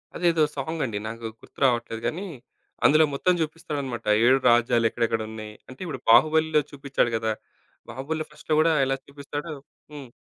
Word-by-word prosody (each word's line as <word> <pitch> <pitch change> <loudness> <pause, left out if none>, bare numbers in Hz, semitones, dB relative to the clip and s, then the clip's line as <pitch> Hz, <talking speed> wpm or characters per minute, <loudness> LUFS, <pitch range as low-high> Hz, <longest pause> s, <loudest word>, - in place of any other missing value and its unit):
అదేదో 170 -2 +2
సాంగండి. 135 -6 -3
నాకు 115 +1 -7 0.2
గుర్తు - - -17
రావట్లేదు 120 -3 0
గానీ. 185 +5 -4 0.6
అందులో 155 +2 +6
మొత్తం 180 +6 +2
జూపిస్తాడనమాట. 150 -6 -4 0.2
7 130 +2 +5
రాజ్యాలెక్కడెక్కడున్నాయి. 115 -2 0 0.2
అంటే 130 - -12
ఇప్పుడు 130 -7 -6
'బాహుబలిలో' 155 +5 +5
చూపిచాడు 140 -4 -1
గదా! 110 0 -1 0.6
'బాహుబలిలో' 155 +4 -4
ఫస్ట్‌లో 150 +1 -2
గూడా 165 0 +3
ఎలా 135 0 0
చూపిస్తాడో 145 +3 -7 0.4
హ్మ్. 135 -5 -9
140 Hz, 130 wpm, -25 LUFS, 120-155 Hz, 0.6 s, అందులో